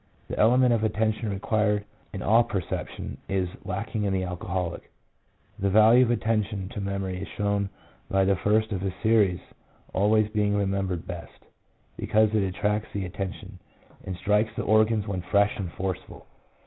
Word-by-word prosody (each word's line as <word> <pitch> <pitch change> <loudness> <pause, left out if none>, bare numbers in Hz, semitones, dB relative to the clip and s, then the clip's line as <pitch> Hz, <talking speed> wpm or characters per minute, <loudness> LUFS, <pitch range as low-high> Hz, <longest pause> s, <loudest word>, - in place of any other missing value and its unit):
The - - -4
element 125 +3 +5
of 115 -1 +1
attention 110 +1 0
required 105 +1 0 0.3
in 95 - -5
all 115 +3 +5
perception, 100 -6 -4
is 95 -2 0 0.2
lacking 100 +3 -3
in 100 - 0
the 95 -1 0
alcoholic. 90 -1 -4 0.7
The 100 - +1
value 110 +5 +6
of 120 - 0
attention 105 -4 0
to 105 - -6
memory 95 -2 -3
is 100 - -5
shown 100 -1 -1 0.4
by 95 0 +3
the 100 0 +3
first 110 +3 +1
of 95 -3 -2
a 95 -1 -1
series 105 -5 +3 0.5
always 105 +2 +3
being 105 -1 +1
remembered 95 -3 -1
best, 85 -2 -8
2 - - -27 0.5
because 110 0 +2
it 110 - +3
attracts 105 +3 -1
the 100 -2 -1
attention, 95 +1 -6 0.4
and 95 - -5
strikes 105 +3 +2
the - - -2
organs 110 -1 +3
when 95 -3 -2
fresh 100 +3 +2
and 90 -4 -4
forceful. 95 -1 -5
100 Hz, 160 wpm, -26 LUFS, 95-110 Hz, 0.7 s, value